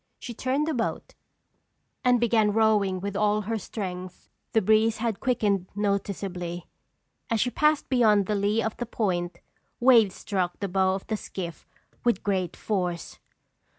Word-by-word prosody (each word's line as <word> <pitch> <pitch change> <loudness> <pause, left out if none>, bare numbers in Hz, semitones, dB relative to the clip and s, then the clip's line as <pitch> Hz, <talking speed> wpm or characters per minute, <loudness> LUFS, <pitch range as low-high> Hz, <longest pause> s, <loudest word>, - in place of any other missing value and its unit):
She 240 - -7
turned 260 +6 0
the 320 - -1
boat, 250 - -3 0.9
and 250 -2 +4
began 220 -3 +3
rowing 210 -4 +2
with 200 0 -4
all 210 +1 +2
her 220 +2 -2
strength. 185 -3 -7 0.2
The 220 - +4
breeze 220 +2 +3
had 225 -3 -2
quickened 210 -7 0
noticeably. 195 -4 -2 0.6
As 230 - +1
she 245 +3 +1
passed 300 +1 +2
beyond 220 -6 +4
the 210 - -1
lee 205 +2 +1
of 220 - -2
the 240 - -4
point, 175 -6 -2 0.4
waves 230 -6 +5
struck 185 -3 -2
the 200 - -2
bow 190 0 +2
of 195 - -6
the 215 - -2
skiff 175 -5 -7 0.4
with 240 -5 +1
great 185 -4 -1
force. 180 -5 -3
210 Hz, 150 wpm, -26 LUFS, 190-225 Hz, 0.9 s, waves